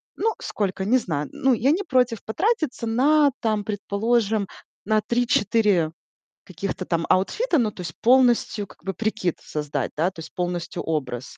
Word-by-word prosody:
Ну 445 +1 0
сколько? 190 -2 -2
Не 240 +6 +4
знаю. 155 - -3
Ну 265 -1 +2
я 255 +4 +2
не 375 +5 +1
против 250 - +1
потратиться 310 - -1
на 285 +5 +4
там, 215 -2 0
предположим, 215 +1 0 0.4
на 215 +1 +2
3-4 210 -7 +2 0.5
каких-то 185 +1 -5
там 170 -1 -1
аутфита. 335 - +2
Ну 225 -5 +1
то 185 - -9
есть 170 -2 -6
полностью 240 -4 +3
как - - -18
бы 195 - -2
прикид 215 -5 -2
создать, 150 -3 -3
да? 170 +5 +1
То 175 - -13
есть 160 - -9
полностью 175 -1 -3
образ. 130 -5 -3
215 Hz, 160 wpm, -24 LUFS, 180-245 Hz, 0.5 s, Не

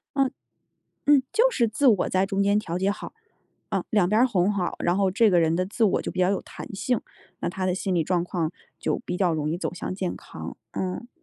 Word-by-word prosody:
嗯。 270 -2 +2 0.8
嗯， 285 -2 +6
就 - - +4
是 240 - +2
自 225 +6 0
我 210 -6 +3
在 190 +1 +2
中 195 0 0
间 205 +1 +3
调 180 -4 -3
节 195 +2 +2
好， 205 - -6 0.6
嗯， - - 0
两 205 -5 +3
边 215 +4 +3
儿 255 - +6
哄 195 -3 +2
好， 185 -3 -2
然 175 +1 +1
后 195 -1 +2
这 215 +3 +4
个 175 -2 +4
人 165 0 +2
的 185 - +1
自 220 +4 -3
我 205 - +3
就 - - -4
比 185 - -2
较 180 - +4
有 200 - 0
弹 - - -9
性， 245 +4 0 0.4
那 - - -1
他 185 +2 -3
的 180 - +1
心 190 0 -1
理 165 -3 +2
状 175 0 +1
况 170 -2 -2 0.3
就 - - -1
比 180 - -3
较 180 -3 +2
容 150 -1 -1
易 165 - -1
走 - - -3
向 180 - -4
健 185 -2 -2
康。 - - -9 0.2
嗯。 185 +6 -3
190 Hz, 260 characters per minute, -25 LUFS, 180-215 Hz, 0.8 s, 嗯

